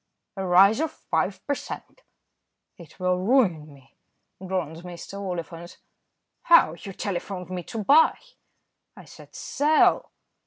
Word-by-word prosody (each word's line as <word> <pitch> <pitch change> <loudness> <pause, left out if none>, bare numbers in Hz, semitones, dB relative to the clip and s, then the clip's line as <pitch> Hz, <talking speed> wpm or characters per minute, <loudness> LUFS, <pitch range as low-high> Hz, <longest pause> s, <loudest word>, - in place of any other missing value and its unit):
"A 195 - -4
rise 190 +5 +5
of 320 0 0
five 180 - -3
per 285 - 0
cent." 390 - -8 0.7
"It 170 +1 -16
will 180 0 0
ruin 185 - +1
me," 135 -1 -20 0.5
groaned 180 -4 -3 0.4
Oliphant. 175 -3 -6 0.6
"How? 335 - +5
you 195 +3 -9
telephoned 185 -1 -5
me 180 -1 -4
to 220 -2 -5
buy." 300 +9 +5 0.8
"I - - -13
said - - -16
'sell.'" 300 +2 +2
185 Hz, 120 wpm, -25 LUFS, 170-215 Hz, 0.8 s, rise